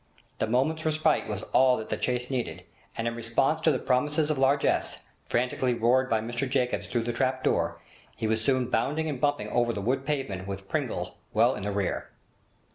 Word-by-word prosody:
The -, -, +1 dB
moment's 140 Hz, +7 st, +1 dB
respite 155 Hz, -3 st, +1 dB
was 105 Hz, -2 st, -4 dB
all 130 Hz, -1 st, +5 dB
that 110 Hz, -, -6 dB
the -, -, 0 dB
chase 125 Hz, +1 st, -2 dB
needed, 125 Hz, -3 st, -3 dB, 0.3 s
and 115 Hz, -, -1 dB
in 115 Hz, -, -1 dB
response 120 Hz, +7 st, 0 dB
to 160 Hz, -, +4 dB
the 135 Hz, -, +1 dB
promises 150 Hz, +5 st, +1 dB
of 150 Hz, -, -1 dB
largesse, 135 Hz, +1 st, +2 dB, 0.3 s
frantically 125 Hz, +1 st, +1 dB
roared 125 Hz, +3 st, +3 dB
by 110 Hz, -1 st, +2 dB
Mr 120 Hz, +4 st, -3 dB
Jacobs 125 Hz, -2 st, 0 dB
through 120 Hz, -2 st, -1 dB
the 120 Hz, +1 st, -2 dB
trap 130 Hz, +2 st, 0 dB
door, -, -, +1 dB, 0.4 s
he 115 Hz, -, -4 dB
was 110 Hz, 0 st, 0 dB
soon 130 Hz, -2 st, +1 dB
bounding 150 Hz, +7 st, 0 dB
and 140 Hz, -5 st, -4 dB
bumping 145 Hz, 0 st, +1 dB
over 120 Hz, -1 st, +2 dB
the 105 Hz, -, -3 dB
wood 130 Hz, +6 st, 0 dB
pavement 135 Hz, -10 st, -3 dB
with 100 Hz, 0 st, -6 dB
Pringle -, -, -3 dB
well -, -, +4 dB
in -, -, -6 dB
the 105 Hz, +1 st, -2 dB
rear. 100 Hz, -2 st, -2 dB
125 Hz, 200 wpm, -28 LUFS, 115-135 Hz, 0.4 s, all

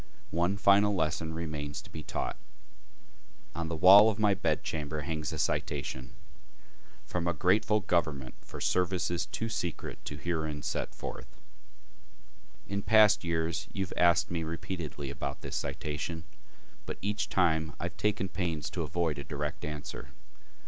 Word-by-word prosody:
One 85 Hz, +4 st, +1 dB
final 100 Hz, +1 st, +5 dB
lesson 80 Hz, -1 st, 0 dB
remains 75 Hz, -3 st, -4 dB
to -, -, -15 dB
be 80 Hz, -, -6 dB
taught. -, -, -3 dB, 1.2 s
On 85 Hz, 0 st, -3 dB
the 85 Hz, -, -2 dB
wall 100 Hz, +6 st, +9 dB
of 105 Hz, -, -2 dB
my 105 Hz, -2 st, +4 dB
bedchamber 75 Hz, -6 st, -1 dB
hangs 80 Hz, -1 st, -3 dB
a -, -, -4 dB
citation 65 Hz, -3 st, -2 dB, 0.9 s
"from 90 Hz, -1 st, -2 dB
a 85 Hz, -, +1 dB
grateful 105 Hz, +6 st, +3 dB
government 75 Hz, -8 st, 0 dB
for -, -, -9 dB
services 90 Hz, -1 st, +1 dB
too 115 Hz, -, -3 dB
secret 90 Hz, -7 st, -4 dB
to 75 Hz, -, -5 dB
be -, -, -14 dB
herein 80 Hz, -4 st, -2 dB
set -, -, -3 dB
forth." -, -, -8 dB, 1.3 s
In 100 Hz, 0 st, -2 dB
past 110 Hz, -1 st, +6 dB
years 80 Hz, -1 st, -1 dB
you 100 Hz, -, -1 dB
have 90 Hz, -, -6 dB
asked 85 Hz, 0 st, +4 dB
me 85 Hz, -1 st, -1 dB
repeatedly 80 Hz, -3 st, -4 dB
about 70 Hz, 0 st, -4 dB
this -, -, -5 dB
citation, 75 Hz, +3 st, -3 dB, 0.6 s
but -, -, -4 dB
each 105 Hz, +1 st, -1 dB
time 80 Hz, -4 st, +2 dB
I -, -, -5 dB
have -, -, -4 dB
taken 105 Hz, -2 st, +1 dB
pains 85 Hz, -6 st, -2 dB
to -, -, -2 dB
avoid 85 Hz, -4 st, -1 dB
a -, -, -4 dB
direct 75 Hz, +1 st, -4 dB
answer. 75 Hz, -1 st, -6 dB
85 Hz, 150 wpm, -31 LUFS, 75-95 Hz, 1.3 s, wall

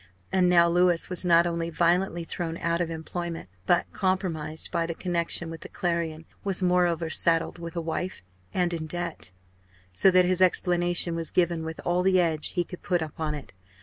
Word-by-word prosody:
And 185 Hz, -1 st, +3 dB
now 170 Hz, -1 st, +6 dB
Louis 175 Hz, 0 st, +2 dB
was 180 Hz, -, 0 dB
not 170 Hz, -1 st, +5 dB
only 170 Hz, -1 st, -2 dB
violently 175 Hz, +1 st, +1 dB
thrown 165 Hz, 0 st, -4 dB
out 170 Hz, +1 st, 0 dB
of 170 Hz, -, -1 dB
employment, 165 Hz, -, -5 dB, 0.2 s
but 175 Hz, -, +3 dB
compromised 170 Hz, -5 st, -2 dB
by 170 Hz, -2 st, 0 dB
the 165 Hz, -, -4 dB
connection 170 Hz, -1 st, -1 dB
with 165 Hz, -, -8 dB
the -, -, -9 dB
Clarion; 170 Hz, -3 st, -2 dB, 0.2 s
was, 195 Hz, -1 st, 0 dB
moreover, 175 Hz, -2 st, +2 dB
saddled 165 Hz, +1 st, +1 dB
with 170 Hz, 0 st, -7 dB
a 170 Hz, -, -1 dB
wife 165 Hz, -, -4 dB, 0.3 s
and 180 Hz, -1 st, 0 dB
in 160 Hz, -2 st, -4 dB
debt. 175 Hz, -, -4 dB, 0.6 s
So 190 Hz, -, +5 dB
that 185 Hz, -1 st, +5 dB
his 185 Hz, 0 st, +1 dB
explanation 175 Hz, -1 st, +3 dB
was 165 Hz, -1 st, -3 dB
given 170 Hz, -2 st, +1 dB
with 160 Hz, 0 st, -6 dB
all 175 Hz, +1 st, +2 dB
the 185 Hz, 0 st, +3 dB
edge 160 Hz, -3 st, +1 dB
he 175 Hz, -, +1 dB
could 180 Hz, +1 st, -10 dB
put 175 Hz, -2 st, 0 dB
upon 155 Hz, 0 st, -4 dB
it. 145 Hz, -, -10 dB
170 Hz, 185 wpm, -26 LUFS, 165-180 Hz, 0.6 s, now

